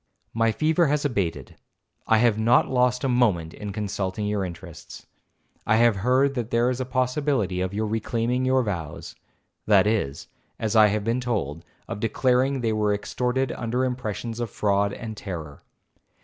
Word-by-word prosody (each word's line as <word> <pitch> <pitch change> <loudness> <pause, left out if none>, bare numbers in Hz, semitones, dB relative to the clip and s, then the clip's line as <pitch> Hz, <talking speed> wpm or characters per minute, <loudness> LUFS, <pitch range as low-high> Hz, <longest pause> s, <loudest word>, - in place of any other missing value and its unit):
'My 115 0 +2
fever 160 +6 +2
has 145 +1 0
abated—I 95 - -3
have 115 -1 +3
not 115 +3 +4
lost 125 0 +1
a - - +1
moment 105 -11 +1
in 105 -1 -6
consulting 100 0 -3
your 105 -1 -1
interests—I 85 +4 -7
have 115 -2 +4
heard 130 +7 +2
that 120 -4 -3
there 120 +1 +2
is 130 0 -3
a - - -2
possibility 125 -6 0
of 95 0 -1
your 105 +2 -2
reclaiming 115 +3 -1
your 130 0 +2
vows—that 95 +2 -2
is, 105 -11 -1 0.3
as 110 0 -2
I 110 -1 +7
have 105 0 -1
been 115 +3 0
told, 85 - -3 0.2
of 100 - -5
declaring 130 +4 +1
they 115 -2 0
were 105 -1 +1
extorted 125 +5 -1
under 125 +2 -1
impressions 120 -2 -4
of 120 -2 -2
fraud 100 0 +1
and 110 +1 -7
terror. 80 -8 -7
115 Hz, 155 wpm, -25 LUFS, 100-125 Hz, 0.3 s, I